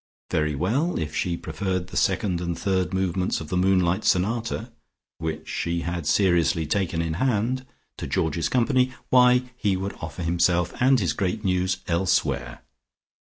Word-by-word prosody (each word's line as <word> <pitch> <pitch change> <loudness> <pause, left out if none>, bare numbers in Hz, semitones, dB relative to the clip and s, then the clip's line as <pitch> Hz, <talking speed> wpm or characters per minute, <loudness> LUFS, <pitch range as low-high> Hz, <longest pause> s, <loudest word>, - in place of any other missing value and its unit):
Very 75 -1 +1
well, 125 - 0
if 75 -1 -3
she 85 -2 -1
preferred 95 -2 -3
the - - -10
second 95 -2 +1
and 85 -1 -3
third 95 -2 0
movements 95 -1 0
of 80 - -8
the - - -2
Moonlight 90 +1 +2
Sonata, 115 +4 0 0.5
which 80 -1 -4
she 85 0 -2
had 85 -3 -3
seriously 85 -5 +2
taken 85 0 0
in 80 -1 -2
hand, 130 +1 0 0.3
to - - -5
Georgie's 80 +1 0
company, 130 +1 +2 0.2
why, 125 0 +4
he 100 -6 0
would 95 +1 -4
offer 80 +2 -6
himself 85 +1 +1
and 130 0 +5
his 85 -8 0
great 100 +4 -2
news 95 0 0
elsewhere. 70 -8 0
90 Hz, 155 wpm, -25 LUFS, 85-105 Hz, 0.5 s, and